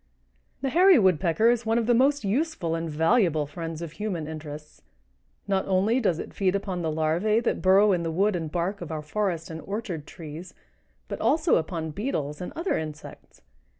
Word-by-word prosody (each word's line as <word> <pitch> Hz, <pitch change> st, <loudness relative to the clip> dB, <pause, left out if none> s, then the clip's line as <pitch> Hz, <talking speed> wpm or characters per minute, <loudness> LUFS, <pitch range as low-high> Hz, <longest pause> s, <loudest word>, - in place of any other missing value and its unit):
The 270 Hz, -, 0 dB
Hairy 365 Hz, +4 st, +6 dB
Woodpecker 185 Hz, +2 st, +3 dB
is 240 Hz, -1 st, 0 dB
one 225 Hz, 0 st, +1 dB
of 235 Hz, -, +1 dB
the 240 Hz, -, +3 dB
most 275 Hz, +3 st, +3 dB
useful 210 Hz, -, -1 dB
and 165 Hz, 0 st, -2 dB
valuable 160 Hz, 0 st, +2 dB
friends 165 Hz, +2 st, -6 dB
of 165 Hz, -, -6 dB
human 180 Hz, -3 st, -4 dB
interests. 155 Hz, -1 st, -8 dB, 0.7 s
Not 195 Hz, -1 st, 0 dB
only 195 Hz, +6 st, +2 dB
does 190 Hz, -9 st, +1 dB
it -, -, -7 dB
feed 190 Hz, -1 st, +1 dB
upon 190 Hz, -3 st, -3 dB
the 160 Hz, -, -1 dB
larvæ 165 Hz, +9 st, +1 dB
that -, -, -1 dB
burrow 195 Hz, +2 st, +5 dB
in 180 Hz, -2 st, +1 dB
the 165 Hz, -, -2 dB
wood 195 Hz, +5 st, +1 dB
and 160 Hz, -3 st, -4 dB
bark 180 Hz, +4 st, -2 dB
of 170 Hz, -, -6 dB
our 155 Hz, -1 st, -4 dB
forest 170 Hz, 0 st, -2 dB
and 160 Hz, 0 st, -6 dB
orchard 195 Hz, -7 st, -5 dB
trees, 165 Hz, +1 st, -9 dB, 0.5 s
but -, -, -5 dB
also 320 Hz, +1 st, +3 dB
upon 160 Hz, -1 st, -3 dB
beetles 150 Hz, -, -3 dB
and 180 Hz, -, -5 dB
other 335 Hz, -, -1 dB
insects. 155 Hz, -1 st, -9 dB
180 Hz, 185 wpm, -26 LUFS, 160-215 Hz, 0.7 s, Hairy